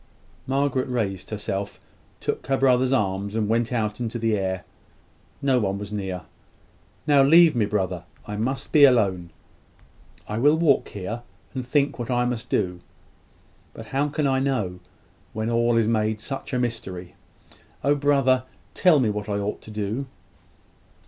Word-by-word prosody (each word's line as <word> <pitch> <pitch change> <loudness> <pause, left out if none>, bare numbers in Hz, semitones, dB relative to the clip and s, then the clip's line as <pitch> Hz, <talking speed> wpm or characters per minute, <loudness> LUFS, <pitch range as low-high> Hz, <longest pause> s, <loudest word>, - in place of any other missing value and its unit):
Margaret 135 -1 0
raised 105 -7 -2
herself; 100 -2 -4 0.4
took - - -3
her 135 0 +2
brother's 130 -1 +3
arm, 100 -5 0
and 110 -2 0
went 115 +2 +1
out 110 -3 -1
into 120 -1 -3
the 115 -1 +1
air. 95 -2 -2 0.8
No 135 -2 +3
one 100 -3 -1
was 105 0 -7
near. 95 -3 -4 0.8
"Now 145 -2 +5
leave 160 +2 +6
me, 110 -4 +2
brother. 95 -4 -2 0.2
I 105 - -5
must 125 +6 -2
be 150 - +6
alone. 100 -10 +4 1.0
I 105 +1 -3
will 145 +5 +4
walk 160 -4 +3
here, 105 +4 -5 0.3
and 130 - -3
think 140 +1 0
what 120 0 -4
I 125 -1 +2
must 125 -2 -3
do. 90 -3 0 1.0
But 115 - -8
how 140 +2 0
can 150 0 -1
I 135 -1 +2
know, 125 -10 -1 0.5
when 110 +1 -2
all 120 0 +2
is 115 -2 +3
made 110 -1 +1
such 135 +4 -6
a 130 - 0
mystery? 95 -7 -4 0.7
Oh, 140 +2 +4
brother, 135 -3 +2 0.3
tell 175 -6 +5
me 115 -5 +2
what 105 0 -4
I 100 - 0
ought 100 +1 -3
to - - -13
do!" 105 +5 -3
115 Hz, 160 wpm, -24 LUFS, 105-135 Hz, 1.0 s, leave